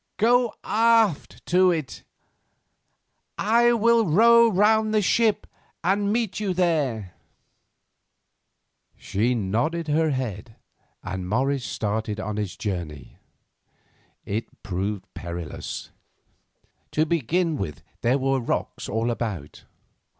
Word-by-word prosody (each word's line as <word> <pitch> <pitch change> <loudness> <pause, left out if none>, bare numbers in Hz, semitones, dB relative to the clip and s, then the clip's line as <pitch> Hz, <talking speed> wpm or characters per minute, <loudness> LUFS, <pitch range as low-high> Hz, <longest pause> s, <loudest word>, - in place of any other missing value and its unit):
Go 240 +1 +3
aft 225 -5 +2
to 185 +1 +4
it, 160 -6 -3 1.4
I 235 +3 +4
will 230 -1 +3
row 230 +7 +6
round 215 +2 +3
the 215 - +4
ship 220 +2 +2 0.4
and 200 +3 +1
meet 220 -4 -1
you 195 -4 -1
there." 140 - 0 1.8
She 115 +5 0
nodded 120 - -1
her 160 +2 +2
head, 115 -5 -4 0.5
and 95 -1 -5
Morris 135 +4 0
started 105 +2 -3
on 105 -1 -4
his 105 -4 -4
journey. 85 -9 -5 1.1
It 110 +3 -5
proved 100 0 -3
perilous. 85 -2 -6 1.0
To 155 - +2
begin 165 +2 0
with, 75 - -5 0.2
there 125 +3 +2
were 135 0 +1
rocks 120 - -3
all 115 +2 0
about. 105 -11 -5
140 Hz, 105 wpm, -24 LUFS, -, 1.8 s, row